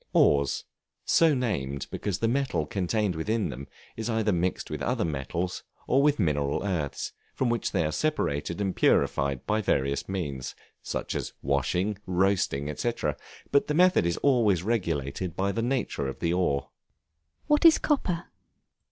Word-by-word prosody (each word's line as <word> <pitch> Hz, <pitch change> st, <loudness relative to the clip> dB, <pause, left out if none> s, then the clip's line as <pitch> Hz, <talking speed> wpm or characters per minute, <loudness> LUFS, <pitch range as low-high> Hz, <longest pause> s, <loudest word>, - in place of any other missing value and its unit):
Ores; 70 Hz, -2 st, +3 dB, 0.4 s
so 160 Hz, -3 st, +4 dB
named 70 Hz, -, -2 dB
because 100 Hz, -3 st, -2 dB
the 115 Hz, -, 0 dB
metal 120 Hz, -, 0 dB
contained 100 Hz, +3 st, 0 dB, 0.2 s
in 110 Hz, -1 st, +1 dB
them 70 Hz, +1 st, -7 dB, 0.3 s
is 110 Hz, +1 st, -4 dB
either 110 Hz, -2 st, +1 dB
mixed 90 Hz, 0 st, -1 dB
with -, -, -4 dB
other -, -, 0 dB
metals, 80 Hz, +5 st, -3 dB, 0.2 s
or 135 Hz, -, +3 dB
with 145 Hz, 0 st, +3 dB
mineral 75 Hz, -6 st, 0 dB
earths, 80 Hz, -8 st, -2 dB, 0.2 s
from 130 Hz, -3 st, +1 dB
which 120 Hz, -3 st, -1 dB
they 80 Hz, -, +1 dB
are 75 Hz, -, -1 dB
separated 85 Hz, -, -1 dB
and 95 Hz, -2 st, -1 dB
purified 70 Hz, -2 st, +2 dB
by 110 Hz, 0 st, +1 dB
various 70 Hz, -6 st, 0 dB
means: 70 Hz, -9 st, -4 dB, 0.3 s
such -, -, -3 dB
as -, -, -4 dB
washing, 90 Hz, +9 st, 0 dB
roasting, 90 Hz, -6 st, +1 dB
&c., 120 Hz, -, 0 dB, 0.6 s
but 140 Hz, -, +3 dB
the 150 Hz, -, 0 dB
method 180 Hz, -, +5 dB
is 85 Hz, -, 0 dB
always 110 Hz, -, +3 dB
regulated 85 Hz, -, -2 dB
by 100 Hz, +1 st, 0 dB
the 115 Hz, -, -2 dB
nature 120 Hz, -, -1 dB
of 65 Hz, -, -5 dB
the 85 Hz, 0 st, 0 dB
ore. 70 Hz, -6 st, 0 dB, 0.7 s
What 295 Hz, +2 st, +3 dB
is 330 Hz, -2 st, +8 dB
Copper? 180 Hz, -, 0 dB
95 Hz, 155 wpm, -27 LUFS, 70-115 Hz, 0.7 s, is